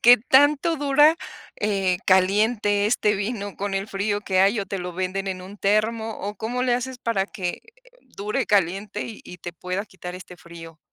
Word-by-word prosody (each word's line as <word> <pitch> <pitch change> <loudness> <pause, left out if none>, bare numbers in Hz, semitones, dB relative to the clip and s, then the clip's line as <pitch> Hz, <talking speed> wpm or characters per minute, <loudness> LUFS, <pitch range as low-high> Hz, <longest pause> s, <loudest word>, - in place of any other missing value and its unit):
¿qué 245 +1 +8
tanto 290 +6 +4
dura, 295 +3 +4 0.4
eh, 195 -4 0
caliente 205 +2 +3
este 215 -2 +2
vino 205 -1 -4
con 200 0 -3
el 195 +2 -2
frío 205 +1 -1
que 190 -2 -1
hay? 200 +3 +3
¿O 195 - -5
te 195 - -4
lo 180 0 -5
venden 185 +2 -3
en 185 -1 -4
un 195 +3 -10
termo 220 +3 +1
o 205 +1 -5
cómo 245 +3 -2
le 245 -1 +2
haces 250 +1 -4
para 200 -5 0
que 180 -4 -5 0.5
dure 210 +4 -2
caliente 200 +2 0
y 225 -3 -9
y 180 - -10
te 175 - -7
pueda 180 +4 -4
quitar 180 -1 -9
este 180 -1 -10
frío? 165 -2 -12
205 Hz, 185 wpm, -24 LUFS, 185-225 Hz, 0.5 s, qué